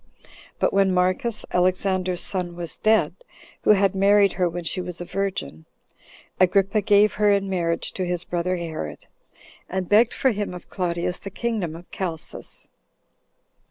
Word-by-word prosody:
But - - +1
when 195 -1 +3
Marcus, 185 +5 0
Alexander's 185 0 +1
son, 180 -3 -2
was 170 -2 -4
dead, 220 0 +3 0.5
who - - -1
had 200 -2 +5
married 200 0 +4
her 180 -1 +1
when 175 +1 -5
she 185 +3 -2
was 180 -1 -6
a 175 - -5
virgin, 175 - -3 0.7
Agrippa 195 +3 +3
gave 205 +1 +4
her 210 -1 +3
in 200 -1 +1
marriage 170 -3 -1
to 185 - -3
his 180 -1 -1
brother 175 +1 -1
Herod, 160 - -6 0.6
and 185 -1 -2
begged 220 +4 +4
for 265 - +2
him 205 -4 -3
of 180 - -11
Claudius 175 -1 -2
the 200 - -7
kingdom 200 -5 -3
of 170 +2 -11
Chalcis. 170 -4 -6
185 Hz, 155 wpm, -24 LUFS, 175-200 Hz, 0.7 s, had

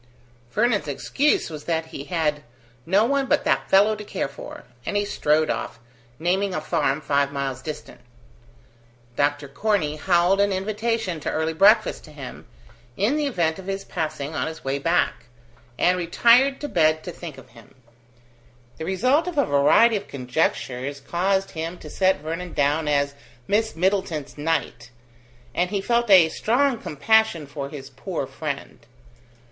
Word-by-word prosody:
Vernon's 215 -4 +1
excuse 285 - 0
was 150 -2 -8
that 165 -1 -1
he 140 - -6
had 155 -4 -1 0.5
"no 195 +5 +4
one 275 +1 +1
but - - +2
that - - 0
fellow 205 +3 +5
to 210 - -8
care 195 -6 -3
for", 140 - -10 0.2
and 205 - -2
he 205 - +1
strode 155 -5 +1
off, - - -4 0.4
naming 185 +4 0
a - - 0
farm 150 -1 0
five 140 -1 +1
miles 135 -2 -3
distant. 155 +1 -8 1.1
Dr. 145 +1 0
Corney 155 -1 0
howled 175 +4 +3
an 200 0 +2
invitation 210 -1 -2
to - - -3
early 160 +1 -1
breakfast 200 +7 +4
to 155 - -14
him, 140 -4 -9 0.5
in 215 +9 +2
the 300 -1 0
event 170 -9 0
of 190 - -10
his 195 0 -3
passing 155 -3 -4
on 150 -2 -1
his 160 0 -8
way 135 +1 -1
back, 165 -6 0 0.5
and 180 +1 +3
retired 240 +10 +4
to 295 - -3
bed 155 - +2
to 180 - -6
think 170 -5 -9
of 130 - -14
him. 115 -2 -18 1.0
The 160 - -5
result 255 - +2
of 350 -4 -4
a 285 - +4
variety 175 +11 +4
of - - -8
conjectures 130 0 -2
caused 190 +6 0
him 165 +2 -5
to 150 - -11
set 190 -5 +2
Vernon 165 +3 -5
down 145 +2 +1
as 140 -1 +1 0.3
Miss 220 +2 +1
Middleton's 175 -5 -1
knight, 145 -5 -2 0.6
and 180 +5 0
he 200 0 -1
felt 235 +3 +1
a 180 -5 +7
strong 245 - +1
compassion 220 0 +2
for 140 -1 -6
his 140 -2 -9
poor 130 - -4
friend. - - -6
170 Hz, 160 wpm, -23 LUFS, 145-205 Hz, 1.1 s, a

